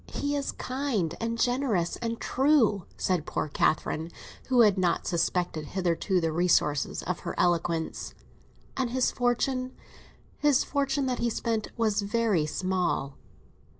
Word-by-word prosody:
He 285 0 -2
is 280 -1 -1
kind, 255 - -2
and 230 0 -1
generous, 245 -8 +1
and 230 -1 -3
true," 255 - +2
said 180 -4 0
poor - - -2
Catherine, 155 +2 0 0.4
who 255 -2 +4
had 210 -4 +5
not 185 -3 +1
suspected 170 -2 -1
hitherto 180 +1 +1
the 165 -2 0
resources 155 -4 +1
of 180 0 -2
her - - -5
eloquence. 170 -2 0 0.6
"And 260 -2 -1
his 255 +1 +1
fortune—his 255 +3 -1
fortune 280 -1 0
that 255 -1 -1
he 235 - +1
spent—was 220 -2 -1
very 205 -6 +1
small!" 180 -6 -1
215 Hz, 125 wpm, -28 LUFS, 175-255 Hz, 0.6 s, had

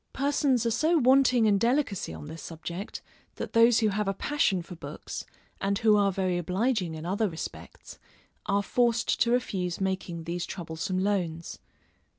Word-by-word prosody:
Persons 275 -3 +1
are 230 - +2
so 320 +8 +2
wanting 255 -3 +5
in 205 -2 +4
delicacy 235 -4 0
on - - -8
this 160 +2 -8
subject, 170 +5 -7 0.3
that - - -6
those 230 0 +5
who 215 - +3
have 210 0 -1
a 195 - 0
passion 200 -9 +1
for 180 - -10
books, - - -7 0.3
and 200 0 +1
who 215 -1 +4
are 200 -1 +3
very 185 -2 0
obliging 185 0 0
in 160 +1 -7
other 205 +4 0
respects, 160 -1 -9 0.5
are 200 +1 +2
forced 235 +1 +1
to 235 - +4
refuse 190 -8 -1
making 190 -3 -2
these 170 +1 -3
troublesome 175 +1 -4
loans. 180 -4 -1
200 Hz, 160 wpm, -28 LUFS, 175-235 Hz, 0.5 s, wanting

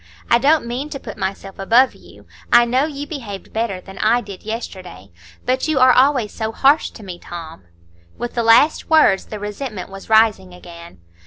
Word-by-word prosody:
I 235 - +6
don't 295 +1 +3
mean 250 +5 -4
to 275 - -6
put 220 - -9
myself 195 0 -5
above 235 +7 +3
you; - - -18 0.3
I 240 0 +6
know 255 +4 +1
you 290 -2 -6
behaved 230 -11 -8
better 220 -4 -2
than 190 +1 -12
I 230 +3 +3
did 200 -5 -10
yesterday. 185 - -8 0.3
But 260 +3 0
you 310 -3 0
are 255 0 +6
always 255 -4 +3
so 220 -1 -3
harsh 280 +6 +3
to 220 - -14
me, 180 -3 -8
Tom." 165 - -10 0.5
With 240 - -5
the 235 - -1
last 230 +7 +4
words 310 -12 +4
the 215 - -7
resentment 210 0 -6
was 195 +2 -11
rising 215 -5 +3
again. 170 - -13
225 Hz, 185 wpm, -19 LUFS, 195-255 Hz, 0.5 s, I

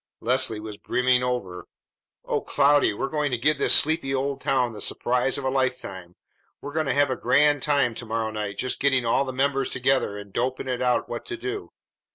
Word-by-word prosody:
Leslie 125 -2 +3
was 105 -1 -8
brimming 125 +2 +1
over. 100 -9 -4 0.6
"O - - -1
Cloudy, 145 -2 +3
we're 105 +6 -3
going 150 0 -1
to 125 - -1
give 145 +4 +1
this - - +2
sleepy 145 -3 +3
old 135 +1 -2
town 125 -3 +1
the 105 - -9
surprise 125 +2 +1
of 140 - -5
a 130 - 0
lifetime! 125 -9 -3 0.4
We're 145 - -8
going 155 -2 -1
to 135 - +1
have 145 -1 +3
a - - 0
grand 145 +4 +3
time 140 -5 +1
to 120 - -6
morrow 110 0 -2
night, 105 -2 -5
just 130 - -2
getting 135 -3 +2
all 130 +4 +2
the 130 - -4
members 135 +1 0
together 130 -5 0
and 100 -1 -11
doping 130 +2 -2
it 125 -1 -2
out 125 -1 +1
what 120 - -6
to 345 - -5
do. 400 +3 -5
130 Hz, 205 wpm, -24 LUFS, 120-140 Hz, 0.6 s, Leslie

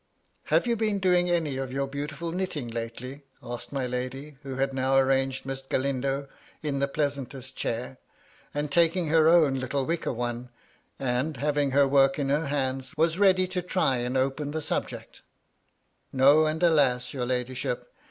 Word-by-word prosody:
" - - -44
Have - - +2
you 235 -1 +1
been 215 -2 0
doing 180 -2 +2
any 160 -6 0
of 135 -1 -4
your 135 +1 -1
beautifiil 145 +4 -5
knitting 180 -8 -3
lately 120 +4 -6
?" - - -32
asked 120 - -7
my 135 -2 -1
lady, 130 +4 -4
who 135 -3 -6
had 135 +1 0
now 135 0 +2
arranged 135 0 +1
Miss 135 0 -4
Galindo 135 +1 -1 0.4
in 140 -2 -1
the 140 - +1
pleasantest 140 -3 -3
chahr, 125 +3 -3 0.5
and 145 0 -3
taken 170 +1 +2
her 160 0 +5
own 155 -6 +4
little 130 +1 -1
wicker 170 +3 -1
work 120 - -6
one, 120 0 -3 0.5
and, 130 +3 -1
having 145 +1 +1
her 140 +1 +4
work 135 0 +4
in 140 -2 -1
her 145 +2 +1
hands, 135 0 -2
was 165 +3 +2
ready 185 -2 +4
to 185 -1 -2
try 180 -7 +1
and 125 +2 -1
open 135 +3 0
the 155 +2 -3
subject - - -4
^ - - -20 0.9
No, 140 +4 +5
and 160 +3 -2
alas! 140 -7 +3
your 125 -3 -2
ladyship. 125 0 -3
140 Hz, 180 wpm, -27 LUFS, 130-155 Hz, 0.9 s, her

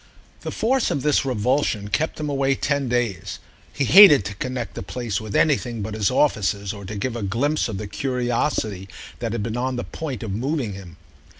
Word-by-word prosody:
The - - -6
force 255 +3 +1
of 140 - -2
this 150 -2 +2
revulsion 120 -3 0
kept 150 +12 -1
him 150 - -2
away 135 -1 +1
ten 140 -1 -1
days: 120 -7 -1 0.3
he 140 - -1
hated 150 - +8
to 100 - -4
connect 125 +3 -4
the - - -6
place 110 +1 -3
with 110 -2 -6
anything 125 -7 +1
but 105 +1 -5
his 105 -2 +1
offices 100 -7 +1
or 100 -1 -9
to 105 +3 -6
give 115 +4 -3
a 120 - -4
glimpse 125 +10 0
of 110 -4 -4
the 105 - -5
curiosity 120 -4 -2 0.3
that 115 -2 -3
had 115 -2 -2
been 115 +2 -3
on 130 +1 -1
the 120 - -3
point 140 -9 -6
of 110 - -4
moving 125 +1 -2
him. 95 -4 -11
120 Hz, 200 wpm, -23 LUFS, 105-135 Hz, 0.3 s, hated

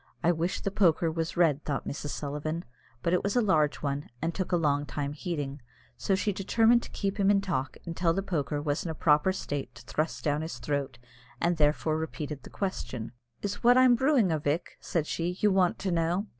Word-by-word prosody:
"I 170 - +5
wish 170 +2 -1
the 195 - -2
poker 170 -4 +3
was 165 +1 -3
red," 155 -4 +3
thought 140 -2 -3
Mrs. 145 0 -4
Sullivan; 150 +4 -3 0.4
but 170 - +1
it 180 - +3
was 200 - -1
a - - +5
large 155 -9 +2
one, 140 0 -2
and 165 +4 -1
took 185 0 -3
a - - +4
long 145 -3 +1
time 145 -1 -3
heating; 145 -4 -4 0.3
so 195 - 0
she 205 +2 0
determined 225 +5 +3
to - - -9
keep 200 0 -3
him 195 0 +4
in 200 -1 +5
talk 160 -9 -2
until 170 0 0
the 195 +4 -1
poker 150 -5 -1
was 145 0 -1
in 170 - -4
a 160 - -3
proper 150 +4 +3
state 145 -9 -4
to 115 - -12
thrust 155 +5 -2
down 150 0 +1
his 160 +1 -5
throat, 140 -3 -2 0.4
and 170 0 +1
therefore 155 +1 +2
repeated 150 -3 -5
the - - -12
question. 130 - -4 0.3
"Is 205 -1 -2
it - - -18
what 245 +1 +6
I'm 255 -1 +7
brewing, 250 - +3
a 160 - +1
vick," 150 +4 -2
said 165 -3 -1
she, 175 +3 -2
"you 210 - +4
want 185 -2 +3
to 190 - -2
know?" 170 +4 +1
165 Hz, 220 wpm, -29 LUFS, 145-190 Hz, 0.4 s, I'm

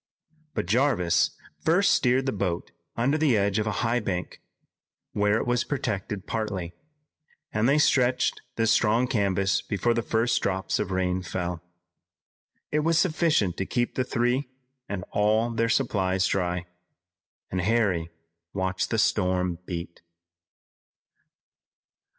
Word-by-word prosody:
But - - -1
Jarvis 105 -5 +2 0.3
first 180 +5 +4
steered 130 +1 +2
the 135 - 0
boat 95 -5 -3 0.3
under 135 +6 +1
the 145 -8 +3
edge 100 +1 +1
of 105 - -1
a - - +1
high 120 +2 +2
bank, 90 -6 -4 0.7
where 105 +1 +2
it - - -2
was 120 0 +1
protected 105 -7 -3
partly, 100 -6 -3 0.8
and 110 +4 +2
they 140 - +4
stretched 130 -3 +2
the 115 - +1
strong 115 +2 +3
canvas 100 -5 +1
before 105 +4 0
the 115 - 0
first 115 0 +1
drops 95 0 -1
of 105 - -2
rain 95 -1 0
fell. 90 -2 -4 1.1
It 150 - +2
was 165 +2 +2
sufficient 160 - +2
to 95 - -1
keep 120 -1 -1
the 130 - 0
three 125 +2 0 0.4
and 100 -3 -3
all 110 +3 +2
their 115 0 0
supplies 95 -7 +1
dry, 90 -2 -1 0.9
and 95 - -1
Harry 95 -5 +1 0.4
watched 95 -1 -1
the 115 - 0
storm 90 -5 +1
beat. 85 -1 -6
105 Hz, 135 wpm, -26 LUFS, 95-120 Hz, 1.1 s, first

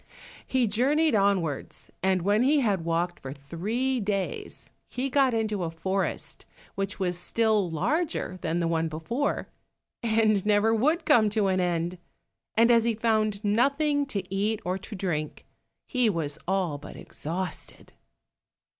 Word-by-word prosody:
He 260 -2 +2
journeyed 280 +9 +2
onwards, 195 -8 0
and 190 -2 +1
when 205 +3 +3
he 285 +3 +4
had 200 -8 +1
walked 170 +1 -1
for 135 - -7
three 210 - -2
days, 200 -3 -3 0.2
he 260 +2 -3
got 270 -1 +4
into 215 -4 -1
a 165 - -1
forest 190 +4 -2 0.3
which 195 0 -3
was 180 -2 -1
still 215 -1 +1
larger 230 - -1
than 165 +2 -1
the 170 - +1
one 165 0 +1
before, 165 - -2 0.5
and 220 -4 +2
never 210 +1 +3
would 305 +9 +2
come 220 -6 +5
to 210 -1 +1
an 185 0 +1
end, 175 0 -1 0.6
and 230 +2 +5
as 230 -1 +5
he 230 -1 +1
found 215 -2 +1
nothing 280 +7 +2
to 200 -8 -4
eat 210 +2 0
or 185 +2 -1
to 210 +3 -8
drink, 165 -6 -3 0.4
he 250 -3 +2
was 155 -6 -2
all 180 -6 0
but 150 - -10
exhausted. 180 +4 -6
205 Hz, 145 wpm, -27 LUFS, 175-235 Hz, 0.6 s, come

